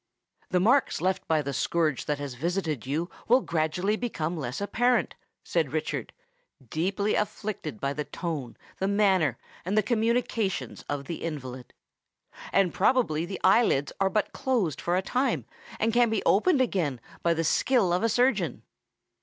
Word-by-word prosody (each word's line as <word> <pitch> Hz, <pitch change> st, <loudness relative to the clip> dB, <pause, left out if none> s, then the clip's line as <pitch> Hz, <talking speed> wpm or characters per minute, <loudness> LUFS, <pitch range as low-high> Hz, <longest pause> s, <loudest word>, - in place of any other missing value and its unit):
"The 180 Hz, -, +2 dB
marks 250 Hz, +9 st, +3 dB
left 185 Hz, +3 st, -1 dB
by 155 Hz, -2 st, +2 dB
the 140 Hz, 0 st, -3 dB
scourge 155 Hz, -1 st, 0 dB
that 150 Hz, -, -1 dB
has 140 Hz, -2 st, -5 dB
visited 155 Hz, -, -2 dB
you 155 Hz, +5 st, -1 dB, 0.2 s
will 250 Hz, +3 st, +5 dB
gradually 170 Hz, +5 st, 0 dB
become 180 Hz, -8 st, -3 dB
less 130 Hz, -6 st, -4 dB
apparent," 245 Hz, +5 st, +1 dB, 0.3 s
said -, -, -1 dB
Richard, -, -, -2 dB, 0.6 s
deeply 195 Hz, +6 st, 0 dB
afflicted 200 Hz, -, -3 dB
by 140 Hz, 0 st, -1 dB
the 150 Hz, 0 st, -3 dB
tone, 145 Hz, -6 st, -5 dB, 0.2 s
the 190 Hz, -, 0 dB
manner, 190 Hz, -, +3 dB, 0.3 s
and 190 Hz, +5 st, -1 dB
the 215 Hz, -, +5 dB
communications 230 Hz, -3 st, 0 dB
of 145 Hz, -1 st, -3 dB
the 165 Hz, -, -5 dB
invalid; 130 Hz, -6 st, -6 dB, 0.8 s
"and 190 Hz, -4 st, +3 dB
probably 185 Hz, -8 st, +2 dB
the 195 Hz, -, -5 dB
eye 195 Hz, +5 st, +6 dB
lids 140 Hz, -9 st, 0 dB
are 195 Hz, -, +4 dB
but 210 Hz, +1 st, -1 dB
closed 230 Hz, -, 0 dB
for 175 Hz, -, 0 dB
a 185 Hz, -, +1 dB
time, 255 Hz, +7 st, 0 dB, 0.3 s
and 225 Hz, +1 st, +1 dB
can 240 Hz, -1 st, +4 dB
be 220 Hz, -2 st, 0 dB
opened 265 Hz, -, +4 dB
again 170 Hz, -, 0 dB, 0.2 s
by 170 Hz, -1 st, +2 dB
the 165 Hz, -, 0 dB
skill 210 Hz, -, +2 dB
of 180 Hz, -, +1 dB
a 230 Hz, -, +2 dB
surgeon." 250 Hz, +4 st, +1 dB
185 Hz, 160 wpm, -27 LUFS, 155-220 Hz, 0.8 s, eye